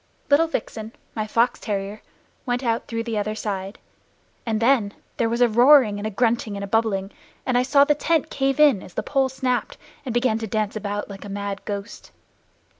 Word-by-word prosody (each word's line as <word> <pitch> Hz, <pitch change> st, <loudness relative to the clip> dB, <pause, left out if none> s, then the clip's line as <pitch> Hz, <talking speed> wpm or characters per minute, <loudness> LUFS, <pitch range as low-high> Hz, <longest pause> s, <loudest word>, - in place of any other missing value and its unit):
Little 315 Hz, +3 st, +5 dB
Vixen, 225 Hz, -8 st, -5 dB, 0.2 s
my 215 Hz, -1 st, -2 dB
fox 235 Hz, +3 st, +1 dB
terrier, 205 Hz, 0 st, -4 dB, 0.4 s
went 245 Hz, 0 st, -2 dB
out 230 Hz, -1 st, -1 dB
through 230 Hz, 0 st, -3 dB
the 225 Hz, -2 st, -2 dB
other 215 Hz, +1 st, -2 dB
side; 195 Hz, -1 st, -4 dB, 0.7 s
and 220 Hz, -1 st, 0 dB
then 230 Hz, -4 st, +2 dB, 0.2 s
there 230 Hz, -, +1 dB
was 235 Hz, +2 st, -1 dB
a 245 Hz, -, +7 dB
roaring 240 Hz, -2 st, +5 dB
and 210 Hz, -, -3 dB
a -, -, -2 dB
grunting 225 Hz, -1 st, 0 dB
and 200 Hz, 0 st, -6 dB
bubbling, 210 Hz, -3 st, +1 dB, 0.3 s
and 255 Hz, -, 0 dB
I 245 Hz, -, +4 dB
saw 280 Hz, +2 st, +5 dB
the 295 Hz, +1 st, +3 dB
tent 320 Hz, +1 st, 0 dB
cave 270 Hz, 0 st, 0 dB
in, 285 Hz, -10 st, +5 dB
as 180 Hz, -, -13 dB
the -, -, -2 dB
pole 270 Hz, -2 st, +1 dB
snapped, 255 Hz, -1 st, -2 dB, 0.3 s
and 260 Hz, -, -4 dB
begin 240 Hz, -1 st, +1 dB
to 225 Hz, -, -4 dB
dance 215 Hz, 0 st, -1 dB
about 205 Hz, -1 st, -3 dB
like 195 Hz, -1 st, -9 dB
a 205 Hz, -, -8 dB
mad 200 Hz, 0 st, -4 dB
ghost. 200 Hz, +1 st, -6 dB
225 Hz, 195 wpm, -23 LUFS, 205-250 Hz, 0.7 s, a